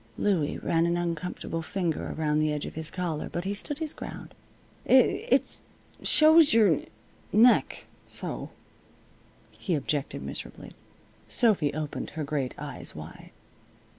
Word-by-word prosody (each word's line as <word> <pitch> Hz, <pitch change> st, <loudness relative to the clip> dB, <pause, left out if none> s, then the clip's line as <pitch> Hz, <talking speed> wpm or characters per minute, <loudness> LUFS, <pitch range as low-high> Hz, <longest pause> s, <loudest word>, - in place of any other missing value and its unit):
Louie 175 Hz, -8 st, 0 dB
ran 165 Hz, 0 st, +1 dB
an 170 Hz, 0 st, 0 dB
uncomfortable 170 Hz, -1 st, -3 dB
finger 170 Hz, -1 st, -3 dB
around 150 Hz, -1 st, +1 dB
the 155 Hz, 0 st, +1 dB
edge 150 Hz, -1 st, -3 dB
of -, -, -7 dB
his 160 Hz, -1 st, -5 dB
collar, 175 Hz, -4 st, -3 dB
but 175 Hz, -, -3 dB
he 195 Hz, +2 st, -2 dB
stood 280 Hz, +8 st, -2 dB
his 315 Hz, -2 st, -3 dB
ground. -, -, -9 dB, 0.5 s
"It 470 Hz, -, +3 dB
it -, -, +1 dB, 0.4 s
shows 310 Hz, -4 st, +6 dB
your 205 Hz, -9 st, +4 dB, 0.5 s
neck 235 Hz, +4 st, +4 dB, 0.2 s
so," -, -, -5 dB, 1.0 s
he 180 Hz, -, -2 dB
objected, 145 Hz, -1 st, -2 dB
miserably. -, -, -8 dB, 0.6 s
Sophy 200 Hz, -, +3 dB
opened 155 Hz, -2 st, -4 dB
her 155 Hz, -, -1 dB
great 140 Hz, -3 st, -3 dB
eyes -, -, -7 dB
wide. -, -, -10 dB
170 Hz, 135 wpm, -27 LUFS, 155-205 Hz, 1.0 s, shows